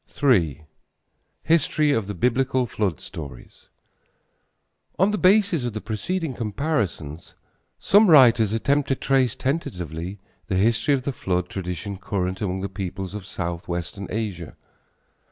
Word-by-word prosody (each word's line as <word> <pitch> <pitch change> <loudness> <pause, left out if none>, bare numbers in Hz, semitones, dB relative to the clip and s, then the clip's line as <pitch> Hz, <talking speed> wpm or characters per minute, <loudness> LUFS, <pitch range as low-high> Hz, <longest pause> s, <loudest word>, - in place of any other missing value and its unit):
III. 80 - +3 0.8
HISTORY 155 -1 +2
OF 115 -7 0
THE 105 - -4
BIBLICAL 125 +5 +1
FLOOD 100 - -2
STORIES. 70 -6 -10 1.3
On 190 +3 +3
the 210 - 0
basis 190 - +4
of 120 -3 -3
the 110 - -3
preceding 140 - -3
comparisons 105 - -3 0.4
some 205 0 +5
writers 120 -8 +6
attempt 140 +6 +1
to 135 - +1
trace 130 -4 +1
tentatively 90 - -3 0.3
the 95 - -1
history 115 +7 +3
of 130 - -4
the 140 - -2
flood 90 -5 -2
tradition 95 +1 -5
current 95 -1 -3
among 95 -2 -2
the 100 - -2
peoples 95 0 -5
of 105 -3 -7
southwestern 85 +2 -4
Asia. 100 -7 -4
105 Hz, 130 wpm, -24 LUFS, 90-135 Hz, 1.3 s, writers